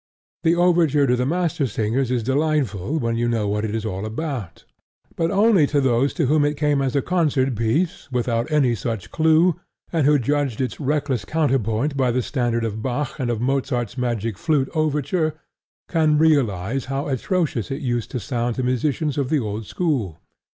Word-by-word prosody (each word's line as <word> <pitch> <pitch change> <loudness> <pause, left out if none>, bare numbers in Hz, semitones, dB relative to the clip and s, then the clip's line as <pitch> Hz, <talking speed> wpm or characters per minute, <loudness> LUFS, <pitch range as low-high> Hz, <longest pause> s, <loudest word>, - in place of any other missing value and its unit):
The 165 +1 +3
overture 170 -5 +3
to 125 -1 +2
The 125 +1 0
Mastersingers 135 - 0
is 125 -2 0
delightful 140 - 0
when 115 -5 -1
you 120 0 0
know 115 -3 0
what 105 +1 -1
it 110 0 -2
is 115 -1 -3
all 95 -2 -3
about; 115 - -5 0.5
but 165 0 0
only 200 -5 +4
those 135 -2 +2
to 160 - +1
whom 150 +3 +3
it 145 0 0
came 145 -2 +1
as 135 -1 -1
a 140 - +2
concert 145 -7 +1
piece 140 - -1
without 120 +1 -1
any 140 -5 +3
such 115 -1 -4
clue, 160 +2 +3 0.3
and 155 -4 +2
who 150 0 +5
judged 140 -2 -1
its 130 -1 -2
reckless 145 -5 -1
counterpoint 135 -1 0
by 130 -2 +2
the 125 +1 0
standard 120 -4 -1
of 110 0 -4
Bach 130 +4 -3
and 125 -3 -1
of 115 -2 -1
Mozart's 125 -3 -1
Magic 115 -5 -2
Flute 145 -5 +1
overture, 155 +1 0 0.5
can 155 -3 +2
realize 135 - +1
how 135 +1 -3
atrocious 145 - -1
it 135 +3 -4
used 120 -3 -1
to 125 - -3
sound 120 -1 -2
to 130 - -2
musicians 140 +4 0
of 135 -2 -1
the 155 - +2
old 110 -2 -4
school. 130 - -1
135 Hz, 180 wpm, -22 LUFS, 115-155 Hz, 0.5 s, who